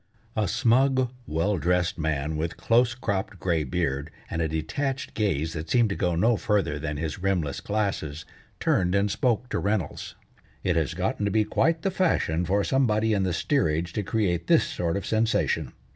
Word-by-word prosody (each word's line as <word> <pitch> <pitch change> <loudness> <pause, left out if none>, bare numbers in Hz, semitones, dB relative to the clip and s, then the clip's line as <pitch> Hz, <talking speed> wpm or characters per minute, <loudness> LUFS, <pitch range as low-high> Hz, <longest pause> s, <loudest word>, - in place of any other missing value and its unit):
A 105 -2 +1
smug, 130 +4 +2 0.2
well 85 +5 0
dressed 90 +2 +1
man, 75 -1 -1
with 80 +2 -3
close 120 +1 +3
cropped 100 -5 -3
gray 85 -4 +1
beard, 70 0 -2 0.2
and 85 - -1
a 80 - +1
detached 130 - -3
gaze 80 -7 0
that 80 +1 -5
seemed 120 -3 +3
to 100 - -2
go 90 -1 0
no 110 +6 +3
further 100 -10 0
than 75 -1 -3
his 80 +1 -3
rimless 90 -8 -1
glasses, 95 -8 -2 0.3
turned 90 0 +2
and 100 0 +2
spoke 120 +2 0
to - - -1
Reynolds: 100 -2 -2 0.5
"It 90 -2 +1
has 80 -5 0
gotten - - -1
to - - +1
be 110 +1 +3
quite 165 +9 +1
the 195 - +1
fashion 90 - +1
for 100 +3 +1
somebody 110 -4 +2
in 100 - +1
the 95 -1 0
steerage 85 - 0
to 105 - -1
create 90 -5 -1
this - - +5
sort 85 +1 -2
of 100 - -4
sensation. 110 0 +1
95 Hz, 180 wpm, -26 LUFS, 80-110 Hz, 0.5 s, this